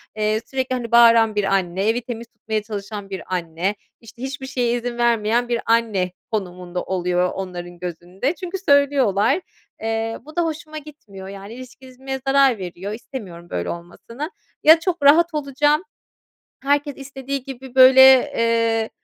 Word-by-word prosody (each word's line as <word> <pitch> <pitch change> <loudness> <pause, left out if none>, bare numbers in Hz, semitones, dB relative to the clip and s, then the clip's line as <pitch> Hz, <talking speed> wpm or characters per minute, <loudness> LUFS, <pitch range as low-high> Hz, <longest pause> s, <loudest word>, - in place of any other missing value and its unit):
eee, 215 0 0
sürekli, 260 -1 -3
hani, 240 -2 -4
bağıran 230 -2 +6
bir 205 - +1
anne, 195 0 0
evi 230 +2 +1
temiz 235 -1 -7
tutmaya 220 -1 -4
çalışan 205 -1 -7
bir 190 -2 -6
anne, 175 +3 -2 0.3
işte, 235 +1 -15
hiçbir 265 0 -5
şeye 245 -3 0
izin 240 0 -5
vermeyen 235 0 +1
bir 235 -1 0
anne 220 -6 +1 0.2
konumunda 180 -4 -4
oluyor 180 -1 0
onların 175 -2 -7
gözünde. 180 - -4
Çünkü 365 0 -5
söylüyorlar, 280 - +2 0.4
eee, 225 0 -2
bu 310 - -13
da 345 - +2
hoşuma 310 -1 -5
gitmiyor, 250 -11 -11
yani, 200 +2 -9
ilişkimize 260 +1 -8
zarar 270 -3 +4
veriyor, 185 +1 -6
istemiyorum 200 -7 -9
böyle 85 0 -3
olmasını. 230 - -7 0.3
Ya 320 +2 +8
çok 340 -2 -2
rahat 325 +4 +5
olacağım, 295 +2 +1 0.8
herkes 285 0 0
istediği 275 -1 -5
gibi 265 -1 -10
böyle, 260 0 +8 0.4
eee, 230 -1 +1
230 Hz, 145 wpm, -21 LUFS, 195-270 Hz, 0.8 s, Ya